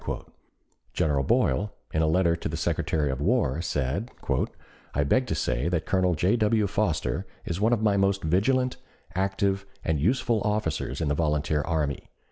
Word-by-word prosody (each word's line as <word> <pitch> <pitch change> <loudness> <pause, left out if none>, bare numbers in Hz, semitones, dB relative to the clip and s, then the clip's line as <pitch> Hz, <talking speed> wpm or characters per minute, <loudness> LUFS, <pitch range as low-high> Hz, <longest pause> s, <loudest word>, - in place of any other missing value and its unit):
General 75 -3 +1
Boyle, 80 +10 +1 0.2
in 80 - +2
a 80 - +3
letter 85 +1 +3
to 85 - -4
the - - -3
Secretary 75 -3 0
of 65 +1 -4
War, 80 - +1
said: 75 - -1 0.9
"I 75 - +3
beg 125 - +2
to - - -1
say 70 +8 0
that 85 -3 -1
Colonel 90 -2 +2
J. 90 +8 +2
W. 110 -1 +2
Foster 100 -5 -1 0.2
is 85 +4 -3
one 110 +3 +3
of 115 -2 +1
the 105 -2 +3
most 95 0 +1
vigilant, 125 +10 +2 0.4
active, 95 +1 0 0.2
and 80 -3 +1
useful 115 - +1
officers 80 - -1
in 80 - 0
the 75 - +2
volunteer 75 -1 +1
army. 75 -3 -2
90 Hz, 165 wpm, -27 LUFS, 75-105 Hz, 0.9 s, a